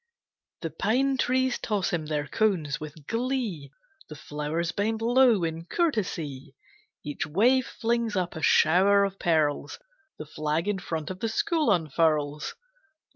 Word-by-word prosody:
The 165 - -4
pine 255 - +1
trees 260 0 +1
toss 205 -5 -1
him 160 -3 -2
their 150 -1 -1
cones 170 -8 0
with 155 -1 -10
glee, 230 - -2 0.4
The 155 - -8
flowers 150 +3 -3
bend 220 +2 -1
low 240 -3 +4
in 165 0 -3
courtesy, 170 - -2 0.5
Each 145 0 -4
wave 245 - +3
flings 230 -2 -1
up 180 -2 -1
a 160 - -6
shower 190 +7 +5
of 195 0 -6
pearls, 155 -4 0 0.4
The 155 - -7
flag 155 +3 -2
in 205 -2 0
front 160 -2 -4
of 185 - -7
the 225 - -1
school 310 +5 +1
unfurls. 155 - 0
180 Hz, 140 wpm, -27 LUFS, 155-225 Hz, 0.5 s, shower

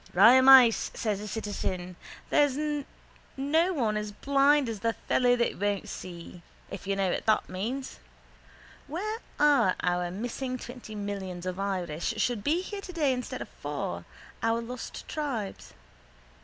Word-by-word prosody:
—Raimeis, 255 +3 +8
says 210 -3 -1
the 210 - -6
citizen. 185 -4 -4 0.4
There's 290 -2 +3 0.8
no 320 +7 +2
one 235 -11 0
as 210 0 -3
blind 280 +4 +3
as 225 -3 -4
the 230 +3 0
fellow 245 +1 +2
that 235 -6 -1
won't 205 -1 -1
see, 175 -1 -8 0.3
if 195 0 -7
you 200 - +1
know 195 -2 +1
what - - -3
that 215 - +3
means. 235 +9 -4 0.9
Where 425 +9 -3 0.2
are 290 -11 +4
our 180 0 0
missing 245 +6 -4
twenty 245 -3 -9
millions 195 -3 -5
of 185 +1 -3
Irish 180 -5 -2
should 235 -5 0
be 325 +5 +2
here 405 +1 -6
today 330 -8 0
instead 250 -1 -4
of - - -15
four, - - -4 0.4
our 225 0 +1
lost 245 +2 -7
tribes? 260 -10 -4
230 Hz, 140 wpm, -28 LUFS, 195-270 Hz, 0.9 s, Raimeis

